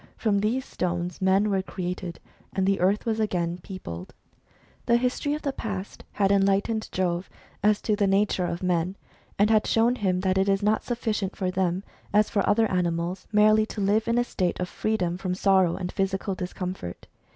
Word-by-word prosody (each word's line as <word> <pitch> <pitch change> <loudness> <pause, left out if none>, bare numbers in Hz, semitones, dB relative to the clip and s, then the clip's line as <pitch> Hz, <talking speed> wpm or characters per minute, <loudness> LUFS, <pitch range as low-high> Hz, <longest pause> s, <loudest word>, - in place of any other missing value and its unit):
From 205 -3 +1
these 230 +6 0
stones 175 0 -3
men 195 +2 +3
were 190 -1 +2
created, 180 -1 -5 0.3
and 190 -1 +1
the 195 0 +2
earth 195 +4 +2
was 225 -1 0
again 175 -5 -1
peopled. 95 - -8 0.7
The 235 - +5
history 255 +4 0
of 305 - -7
the 280 -2 -1
past 200 -5 -6
had 195 -1 +2
enlightened 200 +3 +2
Jove 180 -1 -1 0.3
as 210 +1 +2
to 215 - +2
the 205 -1 +2
nature 195 -2 +2
of 170 +2 -4
men, 180 +1 0 0.4
and 210 +2 +4
had 215 -1 +3
shown 235 +2 +3
him 185 -4 0
that 190 0 +1
it 195 +1 +2
is 195 +1 +2
not 215 +1 +2
sufiicient 220 -5 -2
for 185 -3 -1
them, 185 0 0 0.3
as 210 0 +4
for 200 - +2
other 225 +2 +4
animals, 175 0 -1
merely 215 +1 +5
to 220 - -7
live 205 +3 +2
in 230 +1 +2
a 240 - +4
state 185 -7 -2
of 180 - -1
freedom 180 -4 -1
from 185 -1 -2
sorrow 190 -3 +3
and 180 -1 -4
physical 195 0 -1
discom 180 0 -4
fort. 85 - -8
195 Hz, 190 wpm, -26 LUFS, 180-215 Hz, 0.7 s, The